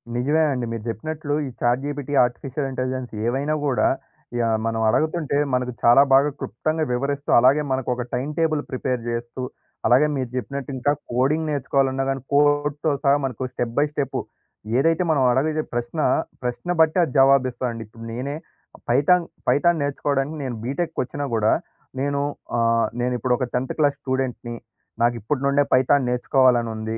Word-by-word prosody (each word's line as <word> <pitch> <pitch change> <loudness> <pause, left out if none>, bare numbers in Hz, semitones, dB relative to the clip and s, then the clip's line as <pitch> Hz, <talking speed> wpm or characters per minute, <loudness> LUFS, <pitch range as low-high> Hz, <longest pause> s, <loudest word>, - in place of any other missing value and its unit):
నిజమే 145 +6 +2
అండి. 125 -3 -2
మీరు 115 -2 -5
చెప్పినట్లు 145 +6 -4
ఈ - - -5
చాట్ 120 +2 +2
జీపీటీ, 145 -1 -4
ఆర్టిఫిషియల్ 135 +3 -4
ఇంటెలిజెన్స్ 130 -1 -3
ఏవైనా 135 +6 0
గూడా 130 -3 +2 0.5
యాహ్! 115 -1 +2
మనం 115 0 -1
అడగతుంటే 155 +2 0 0.2
మనకు 125 0 0
చాలా 120 +3 +7
బాగా 140 +2 +5
క్లుప్తంగా 155 +8 -2
వివరిస్తూ, 140 +3 -2
అలాగే 135 +5 +5
మనకొక 125 -1 -1
టైమ్‌టేబుల్ 150 +4 0
ప్రిపేర్ 130 -1 -2
చేస్తూ, 120 +2 -4 0.5
అలాగే 135 +5 +5
మీరు 130 -3 -2
జెప్పినట్టు 140 +1 -4
ఇంకా 145 +3 +1 0.2
కోడింగ్ 145 +6 +1
నేర్చుకోవాలన్నా 135 -1 0
గానీ, 135 -1 -2
కోడ్‌తో 145 +1 +2
సహా 140 -1 +5
మనకు 130 0 -3
స్టెప్ 120 -1 -3
బై 145 - +4
స్టెప్ 140 -3 -2 0.6
ఏదైతే 165 +4 +2
మనం 140 -4 +2
అడగిజే 155 +4 +1
ప్రశ్న, 120 +6 -3 0.4
ప్రశ్న 125 +8 -4
బట్టి 160 +3 +3
అది 150 - -2
జవాబిస్తదండి. 130 -4 +2
ఇప్పుడు 115 +1 -12
నేనే 135 +5 -4 0.5
పైథాన్, 155 +8 +4 0.2
పైథాన్ 160 +4 +3
నేర్చుకోవడానికి 140 +1 -1
నేను 125 -3 -3
బీటెక్‌కి 160 +7 -3
వచ్చినా 145 +3 -5
కూడా 110 0 +3 0.5
నేను 140 +1 0 0.4
ఆహ్, 115 0 +2
నేను 125 +1 0
ఇప్పుడు 125 +1 +1
ఒక 130 - -1
10థ్ 125 +1 -1
క్లాస్ 145 -2 +2
స్టూడెంట్‌ని 130 -3 -3 0.5
నాకిప్పటి 120 +3 0
నుండే 140 +1 +3
పైథాన్ 130 0 +3
నేర్చుకోవాలని 125 -1 +3
ఉంది. 110 +1 -4
135 Hz, 150 wpm, -23 LUFS, 125-145 Hz, 0.6 s, చాలా